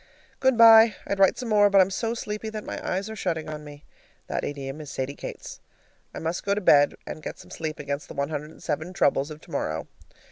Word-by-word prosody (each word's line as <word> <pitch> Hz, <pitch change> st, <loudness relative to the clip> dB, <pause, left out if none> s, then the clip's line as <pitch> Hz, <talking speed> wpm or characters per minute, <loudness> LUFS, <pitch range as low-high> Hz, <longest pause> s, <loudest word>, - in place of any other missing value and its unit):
Good 265 Hz, -2 st, +3 dB
by. 225 Hz, -1 st, +8 dB
I'd 200 Hz, -, -2 dB
write 195 Hz, -1 st, +5 dB
some 245 Hz, -, -5 dB
more, 205 Hz, -1 st, +5 dB
but 200 Hz, 0 st, +5 dB
I'm 190 Hz, 0 st, +4 dB
so 230 Hz, +4 st, -2 dB
sleepy 215 Hz, -1 st, -4 dB
that 215 Hz, -1 st, -6 dB
my -, -, -6 dB
eyes 190 Hz, +3 st, -2 dB
are 220 Hz, -, -6 dB
shutting 165 Hz, -6 st, -2 dB
on 155 Hz, -1 st, -6 dB
me. 145 Hz, 0 st, -12 dB, 0.4 s
(The -, -, -3 dB
idiom 140 Hz, +1 st, -5 dB
is 150 Hz, -, -9 dB
Sadie 135 Hz, +1 st, -3 dB
Kate's.) -, -, -8 dB, 0.5 s
I -, -, -9 dB
must 165 Hz, +2 st, -3 dB
go 200 Hz, 0 st, +1 dB
to 210 Hz, -, -2 dB
bed 145 Hz, -6 st, +5 dB
and 155 Hz, -, -7 dB
get -, -, -6 dB
some -, -, -15 dB
sleep 155 Hz, -1 st, -4 dB
against 140 Hz, 0 st, -4 dB
the -, -, -10 dB
one 140 Hz, +1 st, -1 dB
hundred 150 Hz, -1 st, -4 dB
and -, -, -16 dB
seven 160 Hz, +5 st, -3 dB
troubles 140 Hz, -5 st, +2 dB
of 155 Hz, 0 st, -10 dB
tomorrow. 80 Hz, -, -4 dB
165 Hz, 235 wpm, -25 LUFS, 145-210 Hz, 0.5 s, by